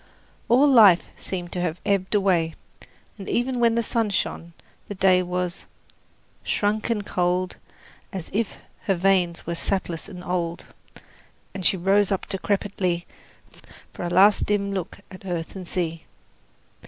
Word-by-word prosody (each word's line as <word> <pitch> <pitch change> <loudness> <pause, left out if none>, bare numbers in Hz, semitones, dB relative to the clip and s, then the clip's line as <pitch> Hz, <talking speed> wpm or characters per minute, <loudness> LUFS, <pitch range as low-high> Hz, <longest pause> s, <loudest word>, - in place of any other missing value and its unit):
All 260 +5 +6
life 215 -10 +7
seemed 175 -2 -5
to 180 - -3
have 175 -1 -2
ebbed 200 0 +1
away, 175 -5 +2 0.6
and 195 - -7
even 250 +1 0
when 230 -1 +3
the 235 - +1
sun 225 -1 0
shone 170 -3 -3 0.3
the 205 - -6
day 185 -1 +4
was 180 0 -3 0.8
Shrunk 215 +2 0
and 210 -3 -1
cold, 180 0 -1 0.5
As 190 -5 -6
if 220 0 -1 0.3
her 195 -3 +2
veins 180 -1 +1
were 170 - -2
sapless 175 -1 -1
and 180 -3 -9
old, 175 -2 -3 0.9
And 190 - -6
she 190 - +3
rose 195 +3 +2
up 195 - -1
decrepitly 190 -3 -1 0.9
For - - -6
a 175 - -2
last 195 +4 +5
dim 200 -1 0
look 190 -4 -5
at 185 - -11
earth 175 -2 -4
and 185 -2 -7
sea. 165 -3 -3
190 Hz, 145 wpm, -24 LUFS, 175-205 Hz, 0.9 s, life